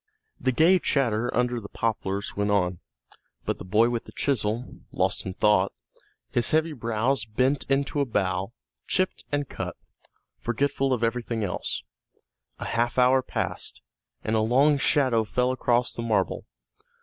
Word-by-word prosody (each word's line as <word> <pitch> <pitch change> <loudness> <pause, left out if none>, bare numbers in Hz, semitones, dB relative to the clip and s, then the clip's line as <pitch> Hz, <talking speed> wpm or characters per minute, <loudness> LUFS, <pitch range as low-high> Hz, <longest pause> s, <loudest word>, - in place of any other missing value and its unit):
The 130 - +1
gay 165 +9 +5
chatter 120 -7 +1
under 125 0 +1
the 100 - -9
poplars 100 -3 -2
went 105 0 0
on, 90 -4 +1 0.7
but - - -2
the - - -6
boy 110 +6 +3
with 120 -1 -2
the - - -12
chisel, 120 -3 0
lost - - 0
in 95 - -5
thought, 105 -3 +3 0.6
his 120 - +1
heavy 160 +1 +2
brows 115 +1 0
bent 130 +6 +1
into 140 +1 +1
a 140 - +2
bow, 95 -5 -1 0.4
chipped 185 0 0
and 145 -1 0
cut, - - -5 0.6
forgetful 135 +3 0
of 120 -2 0
everything 115 -1 -1
else. 90 -9 -3 0.7
A - - -6
half 120 +1 0
hour 130 +1 +5
passed, - - -4 0.4
and 110 - 0
a - - +3
long 135 +6 +4
shadow 130 -5 +3
fell 125 +4 0
across 125 -1 +1
the - - -5
marble. 115 -2 0
120 Hz, 150 wpm, -26 LUFS, 110-135 Hz, 0.7 s, gay